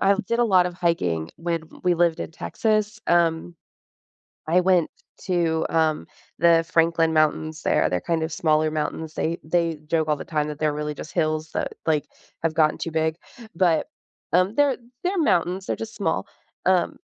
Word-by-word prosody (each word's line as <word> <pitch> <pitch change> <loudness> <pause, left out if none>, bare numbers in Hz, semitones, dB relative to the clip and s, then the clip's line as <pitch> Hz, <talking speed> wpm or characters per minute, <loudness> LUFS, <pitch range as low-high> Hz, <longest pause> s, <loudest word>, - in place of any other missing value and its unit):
I 200 +1 +4
did 235 +1 0
a 240 - +4
lot 185 -5 +4
of 180 -1 -3
hiking 90 - 0
when 165 -1 -2 0.2
we 180 -1 +3
lived 170 -1 +2
in - - -4
Texas, 215 +5 -1
um, 170 0 +2 0.9
I 180 +3 +4
went 180 -3 +3 0.3
t 185 - -3
to, 160 -2 +1
um, 160 -2 +1 0.3
the 165 0 +5
Franklin 165 -1 +3
Mountains 155 0 +1
there, - - +2
they're, 90 - 0
kind 165 - -1
of, 160 0 -3
smaller 155 -1 +2
mountains, 155 +1 -3
they 165 +2 -1
they 165 0 0
joke 160 0 0
all 150 - +2
the - - -7
time 150 -2 -1
that 150 - -6
they're 155 -1 +1
really 150 0 -3
just 155 - -9
hills 155 -2 -1
that, - - -2
like, 155 -2 +1 0.4
have 160 -1 0
gotten 155 -1 +3
too 165 - -4
big, 160 0 0 0.4
but, 165 -3 +2 0.4
um, 185 +4 +3
they're 285 -2 +3 0.3
they're 370 +1 0
mountains, 185 - +1
they're - - -1
just 225 0 -7
small, - - -1 0.4
um, - - +2
165 Hz, 180 wpm, -24 LUFS, 155-180 Hz, 0.9 s, the